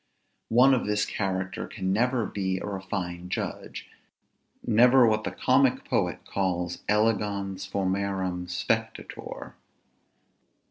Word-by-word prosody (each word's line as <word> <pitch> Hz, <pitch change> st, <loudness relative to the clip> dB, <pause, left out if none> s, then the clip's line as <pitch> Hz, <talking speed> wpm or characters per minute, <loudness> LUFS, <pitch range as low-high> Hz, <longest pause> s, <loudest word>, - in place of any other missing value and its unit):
One 125 Hz, +4 st, +6 dB
of 125 Hz, -, 0 dB
this 105 Hz, 0 st, +1 dB
character 95 Hz, -2 st, -3 dB
can 95 Hz, -3 st, -2 dB
never 120 Hz, +2 st, +1 dB
be 95 Hz, -2 st, -2 dB
a -, -, -5 dB
refined 95 Hz, -3 st, -4 dB
judge; -, -, -4 dB, 0.8 s
never 120 Hz, +3 st, +6 dB
what 110 Hz, -1 st, +2 dB
the -, -, 0 dB
comic 130 Hz, 0 st, +2 dB
poet -, -, -1 dB
calls 90 Hz, -2 st, -2 dB
elegans 100 Hz, -3 st, 0 dB
formarum 95 Hz, -2 st, -1 dB
spectator. 90 Hz, -, -3 dB
100 Hz, 105 wpm, -27 LUFS, 95-110 Hz, 0.8 s, One